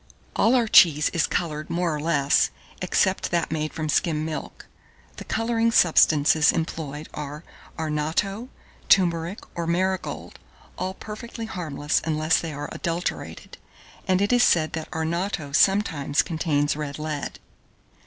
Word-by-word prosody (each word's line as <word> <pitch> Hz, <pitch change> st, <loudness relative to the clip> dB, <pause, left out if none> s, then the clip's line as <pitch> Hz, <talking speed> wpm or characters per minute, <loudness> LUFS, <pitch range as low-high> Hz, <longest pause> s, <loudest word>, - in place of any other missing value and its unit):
All 235 Hz, +3 st, +4 dB
our 240 Hz, -3 st, +2 dB
cheese 155 Hz, -7 st, +6 dB
is 170 Hz, -2 st, 0 dB
coloured 155 Hz, -3 st, -3 dB
more 170 Hz, -1 st, 0 dB
or -, -, -4 dB
less, 145 Hz, -3 st, +2 dB, 0.3 s
except 185 Hz, +1 st, +1 dB
that 170 Hz, -3 st, -1 dB
made 155 Hz, -1 st, -2 dB
from 155 Hz, -1 st, -4 dB
skim 155 Hz, 0 st, 0 dB
milk. 160 Hz, -1 st, -6 dB, 0.5 s
The -, -, -7 dB
colouring 230 Hz, 0 st, 0 dB
substances 155 Hz, -5 st, +5 dB
employed 155 Hz, -2 st, -4 dB
are 150 Hz, +1 st, -6 dB, 0.3 s
arnatto, 160 Hz, +9 st, -2 dB, 0.4 s
turmeric, 175 Hz, 0 st, +2 dB
or 170 Hz, -1 st, -4 dB
marigold, 185 Hz, +2 st, -2 dB, 0.4 s
all 185 Hz, +1 st, -4 dB
perfectly 225 Hz, +2 st, -7 dB
harmless 155 Hz, -8 st, -2 dB
unless 155 Hz, 0 st, +1 dB
they 165 Hz, -, -5 dB
are 145 Hz, 0 st, -6 dB
adulterated; 170 Hz, +1 st, -4 dB, 0.5 s
and 185 Hz, +1 st, +2 dB
it 205 Hz, -, +1 dB
is 245 Hz, -, +4 dB
said 160 Hz, -8 st, +3 dB
that 160 Hz, -1 st, -5 dB
arnatto 160 Hz, -1 st, -2 dB
sometimes 155 Hz, -5 st, +2 dB
contains 150 Hz, -4 st, 0 dB
red 145 Hz, -2 st, -5 dB
lead. 150 Hz, -1 st, -4 dB
165 Hz, 135 wpm, -24 LUFS, 150-185 Hz, 0.5 s, cheese